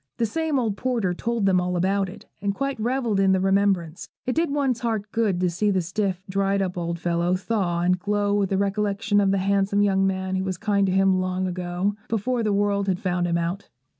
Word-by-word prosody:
The 235 - +1
same 315 +6 -1
old 220 -5 -1
porter 235 -8 0
told 230 +3 -1
them 185 -2 +3
all 180 0 -1
about 195 +2 +1
it, - - -12 0.2
and 200 0 -1
quite 275 0 -2
revelled 235 -3 0
in 195 -1 +4
the 190 - +2
remembrance. 195 -4 +1 0.2
It 255 - 0
did 330 +2 +1
one's 275 -4 0
heart 220 -3 -2
good 215 -6 +1
to 180 - +2
see 205 +5 0
the 190 -2 +2
stiff, 190 +1 -2
dried 195 +1 0
up 185 -2 -1
old 170 -1 -3
fellow 170 +1 0
thaw 185 -3 -1
and 180 +1 +2
glow 205 +1 0
with 200 -2 +1
the 195 - +1
recollection 205 +1 +1
of 195 - +2
the 195 - +2
handsome 200 +1 +2
young 195 -1 +2
man 190 0 -1
who 190 - -1
was 190 -2 -3
kind 200 0 +1
to - - +1
him 190 0 +3
long 185 0 -1
ago, 180 +2 -2
before 230 +3 -1
the 215 -2 0
world 200 0 +1
had 185 -2 0
found 180 -1 0
him 170 0 +1
out. 175 +4 -3
195 Hz, 225 wpm, -24 LUFS, 185-210 Hz, 0.2 s, in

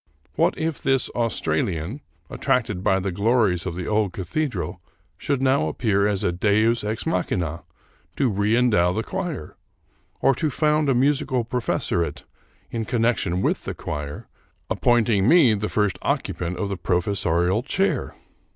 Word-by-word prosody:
What - - +2
if 160 -2 -2
this 135 -1 +1
Australian, 95 - -1 0.3
attracted 90 - -1
by 95 -2 +3
the 95 0 -2
glories 100 -3 +1
of 85 - -4
the 90 -1 -4
old 105 -3 0
cathe 140 - -2
dral, 90 -6 -5 0.4
should 140 -3 -1
now 130 - +3
appear 100 +4 +1
as 100 -2 -1
a - - +2
deus 110 +6 +2
ex 110 +2 -3
machina 85 - -1 0.5
to 140 - +2
reendow 105 -3 +2
the 110 - -1
choir, 175 - -5 0.6
or 135 - +4
to 155 +5 -1
found 150 +1 +1
a 135 - +3
musical 130 -2 +1
professoriate 85 - -1 0.5
in 115 -1 -2
connection 115 -6 0
with - - 0
the - - -4
choir, 75 -1 -6 0.4
appointing 115 -4 +2
me 145 -7 +6
the 105 0 -2
first 105 -4 0
occupant 90 +1 -2
of 100 - -2
the 100 - -3
pro 90 +1 +1
fessorial 90 +2 0
chair? 190 +8 -1
105 Hz, 150 wpm, -23 LUFS, 90-125 Hz, 0.6 s, me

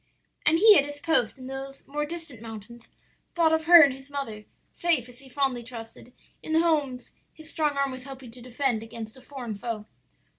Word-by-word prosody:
"And 315 +2 +5
he 425 +3 +8
at - - +2
his 290 0 -8
post 290 -8 +2
in 260 - -10
those 270 +1 -7
more 295 +1 -3
distant 325 -8 -6
mountains, 225 +1 -10 0.5
thought 330 -2 +4
of 320 0 +1
her 340 -1 +10
and 275 -2 +4
his 270 +1 -13
mother; 225 -7 -5 0.3
safe, 330 -9 0
as 245 0 -15
he 270 -1 -15
fondly 265 -2 0
trusted, 230 0 -10 0.3
in 315 - -4
the 320 - +5
homes 290 -7 0 0.2
his 315 0 -10
strong 300 -3 0
arm 275 -1 +1
was 255 0 -8
helping 265 -3 -10
to 245 +1 -13
defend 250 -1 -1
against 225 0 -8
a 260 - -15
foreign 250 -4 -7
foe. 215 +1 -5
270 Hz, 200 wpm, -27 LUFS, 240-295 Hz, 0.5 s, her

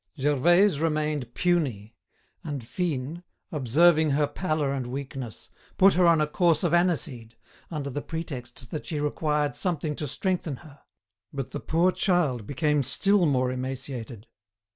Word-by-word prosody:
Gervaise 155 +6 +4
remained 150 -5 -1
puny, 130 - 0 0.5
and 145 -6 -5
Fine, 160 -1 -3 0.3
observing 155 +3 +4
her 145 +1 +2
pallor 155 -4 -1
and 130 -3 -3
weakness, 135 -2 -7 0.3
put 195 +1 +6
her 180 -1 +4
on 165 -2 +5
a 155 - +3
course 160 +2 +2
of 175 -2 +1
aniseed, 155 -10 0 0.3
under 145 -4 -4
the 145 - -3
pretext 130 -7 -6
that 155 - -5
she 155 - -2
required 150 0 0
something 160 -5 -1
to 150 - -3
strengthen 170 +1 -2
her. 145 -2 -15 0.5
But 135 -3 -5
the - - -4
poor 170 +3 +2
child 155 - 0
became 150 +1 +1
still 185 +7 +3
more 130 -3 +1
emaciated. 125 -3 -5
150 Hz, 140 wpm, -26 LUFS, 130-170 Hz, 0.5 s, put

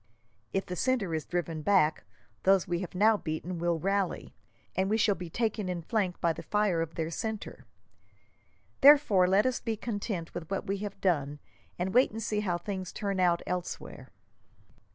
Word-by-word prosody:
If 195 - -1
the 180 - -5
centre 230 -5 0
is 160 -1 -3
driven 165 -2 -2
back, 160 -4 +2 0.4
those 190 -1 +3
we 175 -1 -1
have 185 -1 -6
now 215 +3 +5
beaten 170 +1 -4
will 170 0 +1
rally, 195 +2 -1 0.4
and 190 +1 +1
we 220 - +2
shall 215 -2 +3
be 180 -3 -7
taken 215 -1 -1
in 175 -2 -3
flank 195 -3 -1
by 170 -1 +2
the - - -8
fire 205 -5 +1
of 165 -1 -4
their 160 0 -2
centre. 220 - -5 1.1
Therefore, 275 -11 +7
let 195 +4 +4
us 255 -1 +1
be 225 -2 -3
content 205 -6 -4
with 175 -1 -6
what 195 - -2
we 195 +1 -1
have 205 0 -6
done, 150 -6 +1 0.4
and 185 +2 -2
wait 250 +3 +5
and 225 +1 -6
see 210 0 -1
how 180 -5 0
things 185 0 -5
turn 200 -2 -3
out 175 -2 +3
elsewhere." 180 -1 -5
190 Hz, 180 wpm, -29 LUFS, 175-210 Hz, 1.1 s, Therefore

